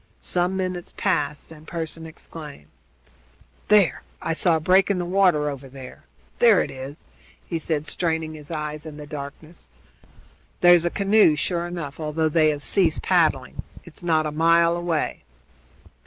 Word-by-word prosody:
Some 180 +1 0
minutes 185 -2 -4
passed, 150 0 -1
then 155 -2 -13
Pearson 165 -1 -5
exclaimed: 150 - -11 1.0
"There! 205 -5 +4 0.2
I 165 - -2
saw 170 0 +3
a - - 0
break 185 +5 +3
in 200 - +1
the 175 - -2
water 180 -5 +2
over 140 -2 -6
there! 130 -1 -12 0.3
There 230 -5 +5
it - - -7
is!" 135 +3 -9 0.4
he 165 - -3
said, 155 -1 -2
straining 160 -2 -1
his 150 -1 -10
eyes 150 -1 -5
in 150 -1 -9
the 150 - -8
darkness. 150 +3 -9 0.9
"That's 175 -1 +6
a - - +2
canoe, 200 -4 +4
sure 170 +3 -2
enough, 165 -5 -6
although 155 +1 -1
they 155 0 +3
have 145 -1 -2
ceased 175 -6 +2
paddling. 155 -8 +1 0.2
It's 170 - -11
not 160 -2 +2
a 150 - -2
mile 170 +2 +3
away." 175 -2 -2
160 Hz, 155 wpm, -23 LUFS, 150-175 Hz, 1.0 s, That's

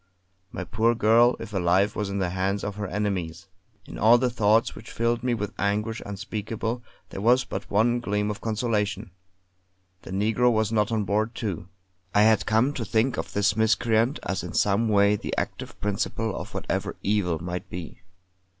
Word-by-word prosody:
My - - -5
poor 115 +2 +1
girl, 115 +2 +5
if 110 - -8
alive, 95 +2 +2
was 105 -2 -2
in 100 - -3
the 90 -3 -1
hands 95 +2 -1
of 105 -1 -3
her 105 -1 -3
enemies. 95 -4 -3 0.4
In - - -9
all 115 +3 +7
the 125 0 0
thoughts 110 0 +3
which 110 - -11
filled 115 0 0
me 125 -1 0
with 105 -3 -4
anguish 105 +3 -1
unspeakable 110 +3 -4 0.3
there 95 - -6
was 125 +4 +4
but - - -6
one 115 +4 +2
gleam 105 -2 -1
of 105 - -7
consolation 110 -3 -1 0.9
the - - -12
negro 110 +6 +2
was 110 -1 +1
not 105 -1 +1
on 110 -2 +1
board, 105 +4 0
too. 95 -7 -4 0.5
I 105 - +6
had 110 -2 +3
come 115 +6 +3
to 125 - -3
think 115 +4 +1
of - - -4
this 100 0 +2
miscreant 115 +3 +2
as 95 - -2
in - - -7
some 105 +3 +2
way 100 0 +4
the - - -5
active - - -4
principle 105 +2 -2
of - - -7
whatever - - -2
evil 100 -5 +1
might 90 +2 -5
be. 85 -3 -8
105 Hz, 180 wpm, -26 LUFS, 100-115 Hz, 0.9 s, all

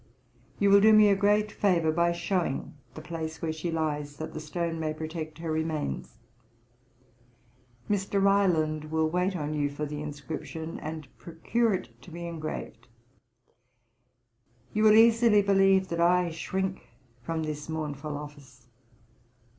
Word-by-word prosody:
'You 200 -1 +3
will 200 0 +7
do 220 +1 +7
me 215 -1 +7
a 200 - +4
great 210 +1 +2
favour 175 -7 +2
by 170 +2 +2
showing 170 -4 -2 0.2
the 155 - -8
place 160 0 -5
where 160 -1 -2
she 160 +2 -4
lies, 150 -3 -2
that 155 +1 -6
the - - -5
stone 165 +2 -3
may 155 -1 -2
protect 155 0 -6
her 165 -1 -4
remains. 155 -1 -3 1.7
'Mr. 200 -1 0
Ryland 175 -6 +2
will 160 +1 0
wait 180 +3 0
on 150 -2 -3
you 145 -1 0
for 145 +1 -4
the 150 0 -5
inscription, 155 +2 -6
and 155 -2 -6
procure 210 +7 0
it - - -9
to - - -13
be 170 +1 -7
engraved. 155 -7 -6 1.9
You 215 +1 +2
will 215 - +8
easily 225 -2 +6
believe 195 -1 +3
that 170 0 -1
I 175 0 +3
shrink 190 +3 -3 0.4
from 160 +5 -3
this 150 0 -5
mournful 150 -2 -4
office. 140 -4 -12
165 Hz, 145 wpm, -28 LUFS, 155-190 Hz, 1.9 s, will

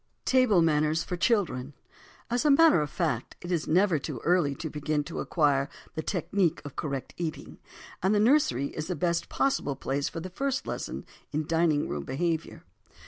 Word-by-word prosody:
TABLE 250 -9 +4
MANNERS 155 0 +2
FOR 180 - -4
CHILDREN 170 - 0 0.6
AS 245 0 +1
a 300 - +3
matter 300 - +6
of 150 - -2
fact, 120 -3 -2
it 175 - -7
is 170 -3 0
never 180 -1 +3
too 135 -3 -5
early 170 -5 +2
to 160 - -5
begin 150 0 -1
to 165 - -6
acquire 140 -4 +1 0.2
the 160 - -3
technique 175 0 0
of 145 - -8
correct 140 -4 -4
eating, 165 -3 -5 0.4
and 190 +3 +2
the - - +3
nursery 215 - +3
is 155 0 -4
the 180 - -2
best 170 +2 -1
possible 270 - 0
place 140 +2 -2
for - - -6
the 185 +2 -7
first 275 +6 -2
lessons - - -5 0.3
in 155 +1 -1
dining 160 -2 +2
room 75 -1 -3
behavior. 165 - -2
165 Hz, 180 wpm, -28 LUFS, 145-185 Hz, 0.6 s, matter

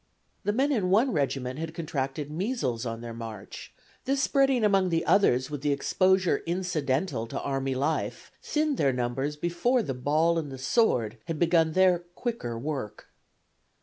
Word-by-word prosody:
The 205 - +1
men 270 +7 +1
in 205 -9 +1
one 225 +8 +4
regiment 135 -1 -1
had 165 0 -5
contracted 145 -2 -3
measles 150 - -2
on 115 0 -5
their 120 -1 -6
march; 115 -3 -8 0.3
this 275 +1 +1
spreading 270 -5 +3
among 195 -3 +3
others 130 -9 +3
with 145 -2 -4
the 145 0 +1
exposure 185 +6 +2
incidental 155 -7 -1
to - - -4
army 135 -1 -2
life 145 +5 -2
thinned 300 -2 0
their 140 -2 +3
numbers 125 +4 -2
before 175 +11 +1
the 135 - -3
ball 155 +6 +2
and 150 -4 -5
the 135 - -7
sword 125 - +1
had 165 -2 -3
begun 165 -1 +3
their 185 -1 +4
quicker 175 - -5
work. 135 -4 -5
155 Hz, 155 wpm, -27 LUFS, 130-190 Hz, 0.3 s, one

